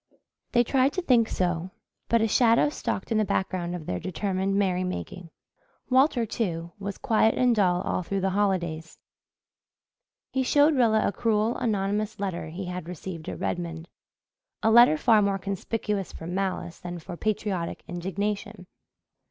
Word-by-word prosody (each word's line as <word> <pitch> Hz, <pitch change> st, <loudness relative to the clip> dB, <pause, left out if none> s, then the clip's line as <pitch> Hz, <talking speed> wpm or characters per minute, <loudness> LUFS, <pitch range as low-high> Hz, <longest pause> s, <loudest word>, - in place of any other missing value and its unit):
They 240 Hz, -1 st, +5 dB
tried 265 Hz, +3 st, +2 dB
to 370 Hz, -, -2 dB
think 240 Hz, -8 st, +3 dB
so, 175 Hz, -1 st, -1 dB, 0.4 s
but 230 Hz, -1 st, +3 dB
a -, -, +3 dB
shadow 230 Hz, +4 st, +4 dB
stalked 230 Hz, -7 st, -4 dB
in 220 Hz, -, +3 dB
the -, -, +3 dB
background 180 Hz, -3 st, -1 dB
of 165 Hz, -3 st, -7 dB
their 90 Hz, -8 st, -2 dB
determined 190 Hz, +1 st, -2 dB
merrymaking. 185 Hz, -2 st, -2 dB, 0.6 s
Walter, 260 Hz, -2 st, +4 dB
too, 170 Hz, -7 st, -3 dB
was 200 Hz, -1 st, -5 dB
quiet 225 Hz, -4 st, +2 dB
and 250 Hz, -2 st, +3 dB
dull, 180 Hz, -3 st, +2 dB
all 185 Hz, -, -1 dB
through 195 Hz, +2 st, -2 dB
the 190 Hz, 0 st, +1 dB
holidays. 175 Hz, -5 st, -1 dB, 1.3 s
He 265 Hz, -, 0 dB
showed 290 Hz, +4 st, +4 dB
Rilla 225 Hz, -4 st, +3 dB
a -, -, +1 dB
cruel, 220 Hz, +1 st, +1 dB
anonymous 210 Hz, -2 st, -1 dB
letter 185 Hz, -5 st, -3 dB
he 175 Hz, +4 st, -6 dB
had 180 Hz, -1 st, -6 dB
received 175 Hz, -2 st, -7 dB
at -, -, -6 dB
Redmond 170 Hz, -2 st, -3 dB, 0.8 s
a 220 Hz, -, +4 dB
letter 235 Hz, -8 st, +7 dB
far 220 Hz, +5 st, +4 dB
more 200 Hz, -1 st, +1 dB
conspicuous 200 Hz, +1 st, -3 dB
for 160 Hz, -, -9 dB
malice 180 Hz, -1 st, -3 dB
than 175 Hz, 0 st, -6 dB
for 175 Hz, +2 st, -8 dB
patriotic 195 Hz, -3 st, -2 dB
indignation. 195 Hz, +3 st, -4 dB
195 Hz, 150 wpm, -26 LUFS, 180-225 Hz, 1.3 s, letter